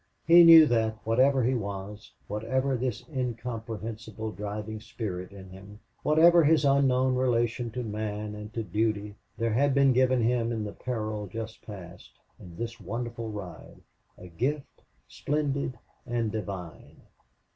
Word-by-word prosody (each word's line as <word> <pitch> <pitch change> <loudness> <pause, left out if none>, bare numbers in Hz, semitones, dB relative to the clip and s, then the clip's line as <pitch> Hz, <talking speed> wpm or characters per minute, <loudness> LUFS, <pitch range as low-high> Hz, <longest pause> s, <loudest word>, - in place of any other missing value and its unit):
He 170 +2 +8
knew 165 -1 +10
that, 110 -4 +1
whatever 130 +4 +3
he 125 +3 +2
was, 100 -2 -5 0.2
whatever 130 +6 -1
this 125 -1 -3
incomprehensible 115 -4 -5
driving 105 +1 -5
spirit 105 -5 -6
in 95 -2 -12
him, 100 +2 -12 0.2
whatever 165 +3 +5
his 155 0 +4
unknown 130 -2 +3
relation 120 -1 0
to 125 +2 -5
man 105 -1 -4
and 105 0 -8
to 115 - -2
duty, 105 +1 -1 0.2
there 115 -1 0
had 140 +3 +2
been 135 -1 +5
given 130 -1 +3
him 120 0 +1
in 110 -2 -2
the 105 -1 -6
peril 110 -4 -4
just 110 +2 -7
passed, 90 -4 -11 0.3
in 85 -2 -12
this 115 0 -5
wonderful 115 +3 -5
ride, 95 -6 -9 0.4
a 90 - -11
gift 135 - -3 0.3
splendid 140 -3 -2 0.3
and 115 -3 -1
divine. 100 -6 -7
115 Hz, 140 wpm, -28 LUFS, 105-130 Hz, 0.4 s, knew